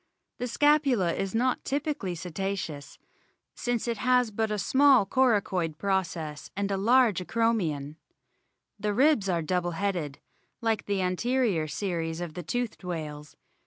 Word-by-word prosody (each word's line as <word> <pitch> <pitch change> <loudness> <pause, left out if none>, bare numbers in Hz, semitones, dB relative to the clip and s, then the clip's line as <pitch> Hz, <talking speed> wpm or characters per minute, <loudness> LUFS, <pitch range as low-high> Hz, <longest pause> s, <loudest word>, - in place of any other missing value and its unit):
The 245 - -2
scapula 270 - +3
is 195 +1 -3
not 250 +2 +1
typically 280 - -2
Cetaceous, 175 -3 -5 0.6
since 245 -1 -2
it 230 -3 -2
has 250 -2 +3
but 220 +1 -1
a 210 - -1
small 265 +2 +5
coracoid 195 -9 +1
process 170 -6 -2
and 200 0 -1
a - - +1
large 225 0 +4
acromion. 175 -8 -1 0.8
The 210 0 -1
ribs 260 -6 +3
are 170 -2 0
double 175 +1 -1
headed, 175 -8 -2 0.4
like 225 -2 -1
the 200 -2 0
anterior 195 -2 +1
series 165 +1 -3
of 175 -3 -5
the 180 - -5
toothed 240 +5 -3
whales. 150 -4 -6
195 Hz, 135 wpm, -28 LUFS, 170-240 Hz, 0.8 s, small